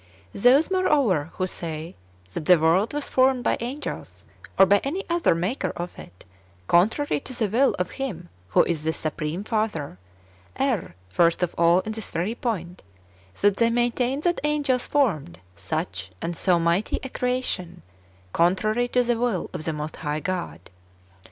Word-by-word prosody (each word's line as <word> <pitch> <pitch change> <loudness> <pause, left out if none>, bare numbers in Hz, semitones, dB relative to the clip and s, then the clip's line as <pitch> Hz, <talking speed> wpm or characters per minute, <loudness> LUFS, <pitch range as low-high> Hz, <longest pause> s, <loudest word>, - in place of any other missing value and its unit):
1. - - -7
Those, 270 - +5
moreover, 275 - +2
who 185 - -1
say 165 -2 -5 0.4
that 155 - -4
the 180 +1 +7
world 165 +7 +3
was 295 -1 -3
formed 260 -1 +3
by - - +2
angels, 255 +6 -6 0.3
or 195 - +8
by 200 +2 +4
any 345 +9 -2
other 340 - +3
maker 185 +10 -1
of 175 +1 -4
it, 90 +1 -13 0.4
contrary 220 - +2
to 265 - -8
the 220 - +1
will 245 +7 +2
of 180 0 -2
Him 190 -11 -5 0.2
who 90 - +4
is 160 -3 -2
the 160 0 0
supreme 155 +4 -3
Father, 210 - -2 0.6
err 250 - -1
first 170 - +2
of 175 - -1
all 170 +2 +4
in 215 - -5
this 220 -1 -6
very 175 +7 -2
point, 185 -8 -4 0.6
that 205 -1 +3
they 230 0 +3
maintain 245 +3 0
that 345 +1 0
angels 290 -4 +1
formed 175 - 0 0.2
such 90 +2 -4
and 170 - -3
so 180 +1 +3
mighty 170 +5 +1
a 265 - -5
creation, 250 -10 -2 0.5
contrary 215 +8 +2
to 250 0 +2
the 240 -1 0
will 235 -7 -1
of 165 -4 -4
the 160 - 0
most 150 +1 -5
high 150 -1 -2
God. 90 - -5
195 Hz, 165 wpm, -24 LUFS, 165-250 Hz, 0.6 s, or